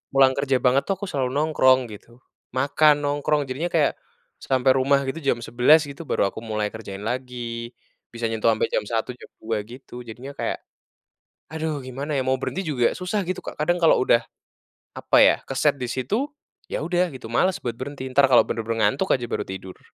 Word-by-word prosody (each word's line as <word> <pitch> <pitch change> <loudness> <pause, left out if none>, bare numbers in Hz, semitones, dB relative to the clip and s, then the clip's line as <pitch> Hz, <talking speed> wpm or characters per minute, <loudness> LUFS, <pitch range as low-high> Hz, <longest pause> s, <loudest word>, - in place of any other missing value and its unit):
pulang 135 -1 +6
kerja 135 -1 +1
banget 130 +2 +3
tuh, 195 - +1
aku 195 -1 -6
selalu 135 -3 0
nongkrong 130 -5 +3
gitu, 120 +4 -14 0.3
makan, 145 +2 +3
nongkrong. 145 +1 +1
Jadinya 140 +7 -2
kayak, 165 -5 +1 0.4
sampai 130 0 +2
rumah 140 +1 +3
gitu, 135 +4 -4
jam 130 -6 -1
11.00 130 +8 +4
gitu, 145 +2 -9
baru 100 -6 +1
aku - - -8
mulai 105 -2 -3
kerjain 100 -3 -8
lagi, 120 -1 -5 0.4
bisa 115 0 -8
nyentuh 110 0 0
ampe 110 - -2
jam - - +2
1.00, 115 +1 -2
jam 125 - -13 0.2
2.00, 110 -1 -1
gitu. 125 0 -11
Jadinya 125 +5 -8
kayak, - - -4 0.9
"Aduh, 155 -3 -3
gimana 140 +4 -4
ya? 130 - +1
Mau 130 0 0
berhenti 190 +7 -3
juga 135 -8 +1
susah." 185 +1 -2
gitu 185 - -3
Kak. - - -8
Kadang, 175 +3 +2
kalau 165 - +5
udah, 120 -2 +3 0.8
apa - - +3
ya, - - +6
keset 140 +2 +1
di 125 - -3
situ, 130 - -1 0.4
ya - - -4
udah 175 -1 0
gitu, 125 -3 -9
males 185 +10 +1
buat 120 -2 -4
berhenti, 140 0 -6
entar, 135 +2 +5
kalau 130 -3 +6
benar-benar 115 -2 0
ngantuk 190 - 0
aja, 130 - -2
baru - - -2
tidur. 95 -1 -8
130 Hz, 190 wpm, -23 LUFS, 120-150 Hz, 0.9 s, pulang